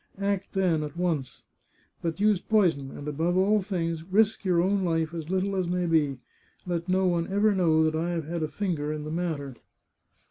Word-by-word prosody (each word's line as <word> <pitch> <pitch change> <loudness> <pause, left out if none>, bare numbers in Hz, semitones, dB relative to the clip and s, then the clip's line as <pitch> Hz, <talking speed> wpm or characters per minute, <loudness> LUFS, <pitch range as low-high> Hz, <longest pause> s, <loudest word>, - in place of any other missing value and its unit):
Act 200 -1 -2
then, 180 -5 +2
at 150 +2 -6
once! 165 -7 -2 0.6
But 165 +1 -3
use 205 -2 +3
poison, 175 -11 +2
and, 145 +2 -8
above 165 +5 0
all 205 +3 +3
things, 170 -4 -2
risk 205 +5 +2
your 180 -3 +2
own 195 +2 +2
life 165 -2 0
as 165 -1 -6
little 190 +1 0
as 185 -2 0
may 180 0 0
be. 155 -5 +2 0.5
Let 175 0 -3
no 190 +1 +2
one 170 -2 +1
ever 205 +2 +3
know 165 -4 +3
that 155 0 +1
I 165 +2 -1
have 170 -3 -2
had 170 +2 -3
a 155 - 0
finger 155 -5 -2
in 155 -1 -4
the 155 - -5
matter." 160 -5 -3
175 Hz, 200 wpm, -27 LUFS, 160-190 Hz, 0.6 s, use